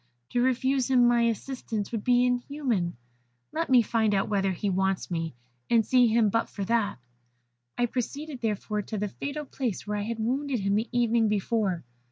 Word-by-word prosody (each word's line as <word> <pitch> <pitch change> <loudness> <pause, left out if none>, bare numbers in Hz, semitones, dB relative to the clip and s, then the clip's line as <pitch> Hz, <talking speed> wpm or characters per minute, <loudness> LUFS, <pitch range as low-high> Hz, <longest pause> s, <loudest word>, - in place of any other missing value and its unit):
To 245 - +1
refuse 260 +1 +1
him 250 -2 +5
my 240 -1 +4
assistance 225 -2 -4
would 225 -3 -3
be 245 0 +4
inhuman. 245 - -1 0.5
Let 330 +1 -2
me 250 -2 +6
find 220 -2 +1
out 195 - 0
whether 195 -2 +1
he 185 +3 -3
wants 190 0 0
me, 165 -5 -2 0.3
and 230 -2 +4
see 250 +1 +5
him 225 -1 +3
but 230 +2 0
for 200 - -4
that.' 225 -2 +1 0.8
"I 245 - +3
proceeded, 265 +3 -4
therefore, 210 -1 -1
to 215 +2 -5
the 205 +1 -1
fatal 285 +7 -5
place 250 -7 -3
where 210 0 -2
I - - -1
had 225 +2 -3
wounded 255 +2 -1
him 200 +1 +1
the 220 +3 0
evening 235 -2 +2
before. 205 -3 0
230 Hz, 185 wpm, -27 LUFS, 205-250 Hz, 0.8 s, me